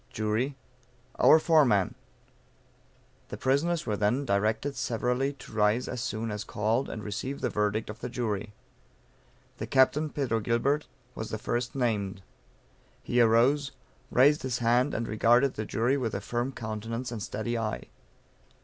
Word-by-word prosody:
Jury. 110 Hz, +6 st, -1 dB, 0.6 s
Our -, -, +8 dB
foreman. 145 Hz, -, +3 dB, 1.4 s
The -, -, -6 dB
prisoners 155 Hz, +6 st, +1 dB
were 105 Hz, -, -1 dB
then 110 Hz, +7 st, +1 dB
directed 110 Hz, +6 st, 0 dB
severally 125 Hz, +2 st, -1 dB
to 135 Hz, -, -13 dB
rise 105 Hz, +3 st, +2 dB
as 125 Hz, -, -4 dB
soon 115 Hz, -2 st, -3 dB
as 105 Hz, 0 st, -4 dB
called, 110 Hz, +5 st, -1 dB
and 110 Hz, -, -6 dB
receive 115 Hz, +7 st, -4 dB
the -, -, -1 dB
verdict 105 Hz, +1 st, 0 dB
of 105 Hz, +1 st, -8 dB
the -, -, -5 dB
jury. 110 Hz, -4 st, -3 dB, 1.1 s
The -, -, -5 dB
Captain, 140 Hz, +3 st, +3 dB
Pedro 130 Hz, -6 st, -1 dB
Gilbert, 120 Hz, +7 st, 0 dB, 0.3 s
was 110 Hz, -, -6 dB
the 110 Hz, -, -3 dB
first 120 Hz, +3 st, -2 dB
named. 105 Hz, -6 st, -1 dB, 0.8 s
He 120 Hz, 0 st, +2 dB
arose, 125 Hz, +5 st, +3 dB, 0.4 s
raised 145 Hz, +4 st, +4 dB
his 125 Hz, -2 st, -2 dB
hand, 120 Hz, +3 st, +2 dB
and 115 Hz, +1 st, -2 dB
regarded 120 Hz, +5 st, +3 dB
the 110 Hz, -, -4 dB
jury 120 Hz, +7 st, +1 dB
with 115 Hz, -5 st, -2 dB
a -, -, -1 dB
firm 120 Hz, +2 st, -2 dB
countenance 115 Hz, +1 st, -5 dB
and 115 Hz, -3 st, -5 dB
steady 120 Hz, +4 st, -3 dB
eye. 110 Hz, -1 st, -2 dB
120 Hz, 150 wpm, -28 LUFS, 110-130 Hz, 1.4 s, Our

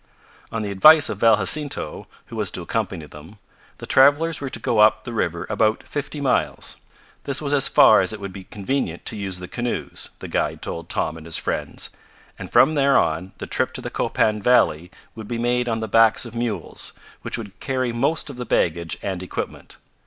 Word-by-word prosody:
On 115 Hz, -1 st, -3 dB
the 100 Hz, -, -3 dB
advice 155 Hz, +11 st, +7 dB
of 100 Hz, -, -4 dB
Val 115 Hz, -1 st, +5 dB
Jacinto, 145 Hz, -, -1 dB, 0.2 s
who -, -, -10 dB
was -, -, 0 dB
to -, -, -4 dB
accompany 80 Hz, -, -3 dB
them, 75 Hz, +8 st, -13 dB, 0.4 s
the -, -, -8 dB
travelers 145 Hz, +4 st, +4 dB
were 140 Hz, -, -3 dB
to -, -, -2 dB
go 115 Hz, 0 st, 0 dB
up 110 Hz, 0 st, +5 dB
the 120 Hz, -, -7 dB
river 85 Hz, -6 st, -2 dB
about 110 Hz, 0 st, +1 dB
fifty 145 Hz, +1 st, -5 dB
miles. 135 Hz, -3 st, -1 dB, 0.5 s
This 140 Hz, -1 st, 0 dB
was 145 Hz, -1 st, -2 dB
as 140 Hz, -2 st, +4 dB
far 110 Hz, -, +6 dB
as 95 Hz, -, -1 dB
it 110 Hz, -, -5 dB
would 100 Hz, -1 st, -7 dB
be 95 Hz, -2 st, -9 dB
convenient 100 Hz, -4 st, -3 dB
to -, -, -1 dB
use 100 Hz, -3 st, -3 dB
the 90 Hz, 0 st, -8 dB
canoes, 120 Hz, +3 st, -4 dB
the -, -, -8 dB
guide -, -, -2 dB
told 85 Hz, +1 st, -6 dB
Tom 80 Hz, -5 st, -1 dB
and 80 Hz, 0 st, -11 dB
his 80 Hz, -, -1 dB
friends, -, -, -3 dB, 0.5 s
and -, -, -8 dB
from 155 Hz, -, +5 dB
there 140 Hz, -2 st, +3 dB
on 85 Hz, +4 st, 0 dB
the -, -, -6 dB
trip -, -, 0 dB
to -, -, -5 dB
the -, -, -6 dB
Copan 105 Hz, -1 st, 0 dB
valley 90 Hz, -8 st, +3 dB, 0.2 s
would 110 Hz, -2 st, -9 dB
be 120 Hz, -, -3 dB
made 120 Hz, +1 st, 0 dB
on 115 Hz, -1 st, -1 dB
the 110 Hz, -, -3 dB
backs 115 Hz, +3 st, +4 dB
of 115 Hz, -, -9 dB
mules, 115 Hz, -7 st, -4 dB, 0.3 s
which -, -, -3 dB
would 105 Hz, -5 st, -9 dB
carry 130 Hz, -2 st, -1 dB
most 155 Hz, +8 st, 0 dB
of 130 Hz, -, -12 dB
the 125 Hz, -, -4 dB
baggage 85 Hz, -5 st, 0 dB
and 95 Hz, -2 st, -3 dB
equipment. 95 Hz, -, -6 dB
110 Hz, 205 wpm, -22 LUFS, 95-130 Hz, 0.5 s, advice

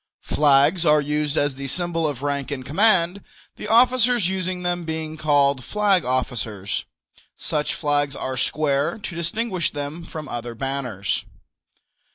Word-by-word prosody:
Flags 150 Hz, +4 st, +4 dB
are 150 Hz, -2 st, +5 dB
used 150 Hz, 0 st, -1 dB
as 145 Hz, -1 st, +2 dB
the 135 Hz, +1 st, -6 dB
symbol 165 Hz, +1 st, -1 dB
of 140 Hz, -3 st, -5 dB
rank 140 Hz, -1 st, -1 dB
and 135 Hz, -3 st, -4 dB
command, 185 Hz, +3 st, +2 dB, 0.3 s
the -, -, -6 dB
officers 245 Hz, -2 st, +4 dB
using 185 Hz, -1 st, -2 dB
them 175 Hz, 0 st, -1 dB
being 160 Hz, -1 st, -4 dB
called 145 Hz, -4 st, +2 dB
flag 205 Hz, -, +2 dB
officers. 115 Hz, -6 st, -2 dB, 0.5 s
Such 150 Hz, -1 st, -1 dB
flags 145 Hz, -2 st, 0 dB
are 130 Hz, -, -3 dB
square, 140 Hz, -, 0 dB
to 195 Hz, -5 st, -7 dB
distinguish 185 Hz, +1 st, -1 dB
them 145 Hz, +3 st, -5 dB
from 155 Hz, -2 st, -7 dB
other 120 Hz, -1 st, -5 dB
banners. 125 Hz, -6 st, -2 dB
150 Hz, 140 wpm, -23 LUFS, 140-175 Hz, 0.5 s, are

